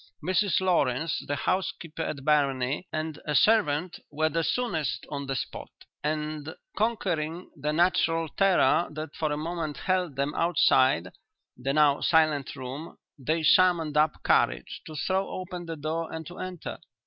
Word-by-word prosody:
Mrs 185 +1 +2
Lawrence, 160 -5 +1
the 145 - -1
housekeeper 165 0 -2
at 140 -4 -4
Barony, 140 +1 +1
and 155 -1 -4
a 150 - 0
servant 180 -4 +3
were 155 +1 0
the 165 +2 0
soonest 160 - -1
on 140 -1 -4
the 135 - -2
spot, - - -5 0.3
and, 155 0 -3 0.2
conquering 180 -7 -1
the 150 0 -2
natural 165 0 +2
terror 190 -2 +3
that 155 0 -6
for 155 -2 -1
a 150 - -1
moment 160 -1 -3
held 185 -6 0
them 140 +2 -1
outside 130 - +3 0.5
the 135 +2 -2
now 150 -1 +4
silent 155 -5 +2
room, 135 +4 -7 0.2
they 155 +5 -1
summoned 165 -2 +4
up 150 +1 +2
courage - - +1
to 155 - -8
throw 190 +5 0
open 180 -2 -6
the 165 - -4
door 160 +2 -3
and 160 0 -6
to 175 - -10
enter. 185 -2 -6
155 Hz, 150 wpm, -27 LUFS, 145-175 Hz, 0.5 s, now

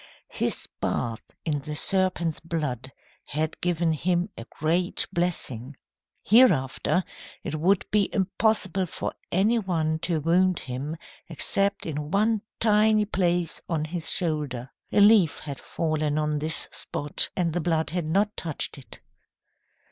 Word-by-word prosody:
His - - -1
bath 115 -1 -2 0.2
in 150 -3 0
the 150 +1 -6
serpent's 180 -2 +1
blood 150 -6 -3 0.4
had 155 +2 -2
given 175 -2 +1
him 175 +4 0
a 115 - -8
great 170 +4 0
blessing. 145 -8 -2 0.5
Hereafter 185 - +4 0.4
it - - -4
would 175 +5 +2
be 205 -1 +3
impossible 190 -1 +1
for - - -4 0.2
any 210 +6 +3
one 160 -6 -1
to 170 -1 0
wound 180 +3 +2
him 135 +5 -5 0.3
except 195 +5 0
in 150 -2 -4
one 215 +4 +2 0.2
tiny 215 -1 +4
place 175 -4 0
on 160 -3 0
his 165 +1 0
shoulder. 150 -8 +1 0.2
A - - +3
leaf 205 -6 +6
had 140 -3 -7
fallen 155 -2 -1
on 150 -1 0
this 155 +2 +1
spot, 145 0 0
and 170 -3 0
the 175 - -1
blood 160 -1 0
had 175 -1 -2
not 200 +6 +1
touched 160 -4 -1
it. 130 - -14
165 Hz, 135 wpm, -26 LUFS, 150-190 Hz, 0.5 s, leaf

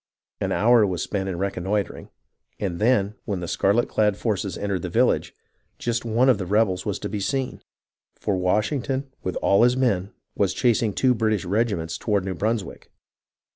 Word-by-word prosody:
An - - -1
hour 120 0 +5
was 95 -4 -1
spent 95 -1 -2
in 90 - -3
reconnoitring, 100 +1 -2 0.5
and 90 -4 -3
then 105 -3 +2
when 100 -4 -2
the 85 - -5
scarlet 100 +8 +2
clad 105 -2 +1
forces 100 -4 -2
entered 100 -3 -2
the - - -4
village, - - +1 0.4
jwt 120 -1 -2
one 120 +3 +2
of 125 -6 +4
the 95 - -4
rebels 100 -2 +1
ivas 105 -1 -1
to 105 - -2
be 105 0 -4
seen; 130 +6 -2 0.5
for 100 - -1
Washington, 130 +8 0
with 95 - -3
all 100 - +4
his 125 +1 +4
men, 100 -7 +1 0.2
was 95 -2 +1
chasing 115 -2 +2
two 130 +5 +2
British 110 -4 0
regiments 95 -5 -1
toward 100 -4 0
New 95 - -2
Brunswick. 110 +1 -3
105 Hz, 175 wpm, -24 LUFS, 95-115 Hz, 0.5 s, hour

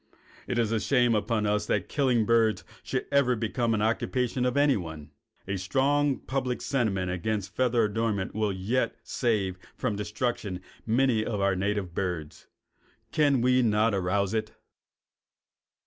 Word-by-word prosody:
It 125 - -2
is 115 -2 +1
a 115 - +1
shame 120 +2 +3
upon 110 0 0
us 105 0 0
that - - 0
killing 125 -6 +2
birds 115 -1 +2 0.2
should - - -3
ever 140 -3 +4
have 115 - -4
become 115 +1 0
an 105 - 0
occupation 125 +2 0
of 125 +2 0
anyone. 85 - 0 0.4
A 95 0 -1
strong 135 +8 +1
public 130 -2 -2
sentiment 100 -9 0
against 100 +2 -3
feather 125 -2 +2
adornments 105 -2 -1
will 105 -1 0
yet 100 +7 -1
save 100 -7 -1 0.2
from 125 -5 -2
destruction 105 -1 -3 0.3
many 115 -1 +2
of 105 -2 -2
our 100 -1 +2
native 100 -1 -2
birds. 85 -5 -4 0.6
Can 145 -5 +3
we 125 +1 +4
not 110 -1 +2
arouse 100 +1 0
it? 110 -1 -2
110 Hz, 145 wpm, -28 LUFS, 100-125 Hz, 0.6 s, ever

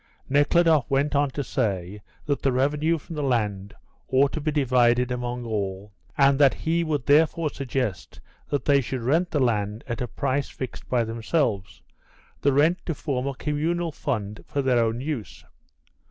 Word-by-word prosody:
Nekhludoff 145 +1 +3
went 140 +1 +1
on 145 0 +2
to 140 +2 -4
say 100 -6 -2 0.2
that 145 -1 -1
the 135 - +2
revenue 150 +6 +1
from 165 +2 -9
the 150 - -2
land 105 -7 -1 0.3
ought 135 +1 +3
to 155 - -4
be 155 - -1
divided 125 -3 +2
among 125 0 -3
all, 100 -2 -4 0.2
and 140 0 +4
that 140 -2 +5
he 165 +1 0
would 150 -6 -2
therefore 155 +1 +3
suggest 125 - -4 0.3
that 145 - -1
they 140 -1 +4
should 130 0 -4
rent 165 +8 +2
the 150 - 0
land 105 -4 0
at 115 -1 -4
a 125 - -1
price 130 +4 -1
fixed 130 - -7
by 120 -2 +2
themselves, 115 - -2 0.6
the 140 - +3
rent 155 +6 +3
to 165 - -1
form 135 -3 -2
a 140 - -3
communal 160 +4 -1
fund 105 -8 -4
for 140 - -2
their 125 -3 +3
own 115 +2 -1
use. 135 - -5
135 Hz, 170 wpm, -25 LUFS, 115-150 Hz, 0.6 s, that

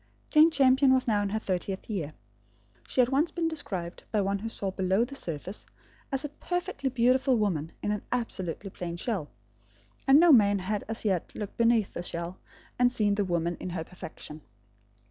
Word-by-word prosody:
Jane 310 +1 +7
Champion 270 -2 +5
was 255 - +1
now 210 -3 +2
in 200 - -1
her 215 - -1
thirtieth 190 -2 -3
year. 170 -9 -3 0.7
She 255 - +3
had 245 - +2
once 285 +5 +2
been 335 -2 -1
described, 190 - -4
by 215 - +2
one 200 0 0
who 225 +3 -4
saw 195 -3 -2
below 190 +4 +1
the 270 - -10
surface, 180 - -5 0.5
as 270 +2 -1
a - - -3
perfectly 350 -2 -3
beautiful 255 +1 +3
woman 170 -7 0
in 205 - 0
an 210 - -1
absolutely 195 -6 -2
plain 170 -2 -5
shell; 185 -7 -2 0.8
and 270 +2 +8
no 345 0 +7
man 205 -4 +5
had 200 +2 -2
as 225 0 -3
yet 190 -5 -1
looked 210 -1 -5
beneath 230 -3 +3
the - - -4
shell, 170 +1 -5 0.4
and 245 0 +5
seen 210 -4 +2
the 205 0 +1
woman 170 -1 0
in - - -5
her 170 -2 -3
perfection. 155 -3 -9
210 Hz, 185 wpm, -28 LUFS, 185-260 Hz, 0.8 s, and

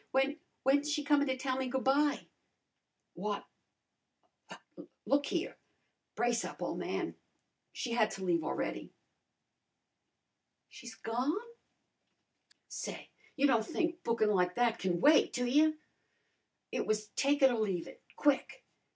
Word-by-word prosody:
When 270 +3 +1 0.2
when's 285 +3 +3
she 295 0 0
comin' 285 0 +3
to 260 0 0
tell 260 0 -1
me 265 -1 -1
goo' 260 +1 -1
by?" 285 +3 +2 0.9
"Why 205 +3 -3 1.1
why - - -10 0.5
look 285 +1 +2
a - - -4
here. - - -2 0.6
Brace 240 -1 +1
up, - - -7
ole - - -2
man. - - -3 0.6
She 245 - -4
had 225 -2 +3
to 190 - -6
leave 170 -3 +1
a'ready." - - -4 1.7
"She's 240 -3 -10
gone?" 250 +9 -1 1.3
"Say, - - -6 0.2
you 285 - +2
don' 235 -5 +4
think 335 - -2
bookin' 225 -2 +2
like 180 -2 +1
that 240 -2 +2
can 175 -2 -1
wait, 300 +1 +5
do 245 - 0
you? 305 +5 +3 0.9
It - - -2
was 215 0 -1
take 280 +1 +1
it 265 - +8
or 235 - -1
leave 190 -6 -1
it - - -13
quick. 290 - +1
255 Hz, 140 wpm, -33 LUFS, 220-285 Hz, 1.7 s, it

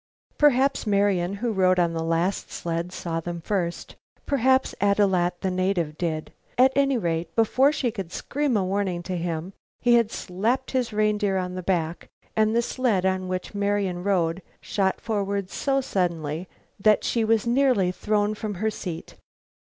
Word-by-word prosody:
Perhaps 275 -4 +3
Marian, 200 -2 +2
who 230 +3 -2
rode 185 -2 +3
on 170 -2 +2
the 165 - -2
last 165 +4 0
sled, 170 +1 -3
saw 165 -2 -3
them 170 +1 -5
first. 175 -1 -3 0.3
Perhaps 265 -1 +2
Ad 200 0 +3
loo 200 -2 +3
at, 175 0 0
the 190 - 0
native, 180 -4 0
did. 155 -2 -3 0.2
At 260 +1 +5
any 275 -1 +3
rate, 165 -4 -2
before 255 +5 +4
she 275 -5 -1
could 195 -6 -6
scream 280 0 -1
a 195 - +1
warning 185 -2 -1
to 185 +1 -4
him 170 +1 -3 0.3
he 240 0 +3
had 235 -2 +4
slapped 225 +9 -2
his 255 -3 0
reindeer 210 -2 +1
on 180 -1 -2
the 185 - -4
back 170 -2 -1 0.3
and 220 +1 +2
the 235 - +3
sled 230 -8 0
on 185 0 0
which 185 +2 -4
Marian 200 -3 -1
rode 180 -3 +1 0.2
shot 190 -2 -1
forward 200 -3 -2
so 275 -1 0
suddenly 170 - -2 0.3
that 210 +1 +4
she 230 - +1
was 220 0 +2
nearly 240 -7 +3
thrown 210 +2 0
from 215 -1 -5
her 220 +4 -1
seat. 175 -5 -7
195 Hz, 170 wpm, -25 LUFS, 175-225 Hz, 0.3 s, At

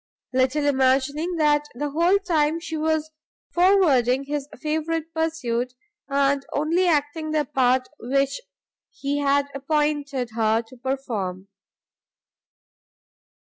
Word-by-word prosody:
Little 260 +3 +2
imagining 280 +5 +1
that 295 -2 +3
the 290 +3 -3
whole 340 +6 +3
time 330 -5 +1
she 335 -1 -6
was 315 0 0 0.4
forwarding 300 -9 +4
his 285 0 -4
favourite 315 +1 -2
pursuit, 255 -7 -1 0.3
and 275 0 +1
only 335 +5 +1
acting 310 0 0
the 305 -1 +1
part 255 -2 +2
which 275 - 0 0.5
he 285 +1 -3
had 285 0 +2
appointed 285 -3 -1
her 220 0 +1
to 230 +3 -16
perform. 225 -8 -4
285 Hz, 105 wpm, -24 LUFS, 260-315 Hz, 0.5 s, forwarding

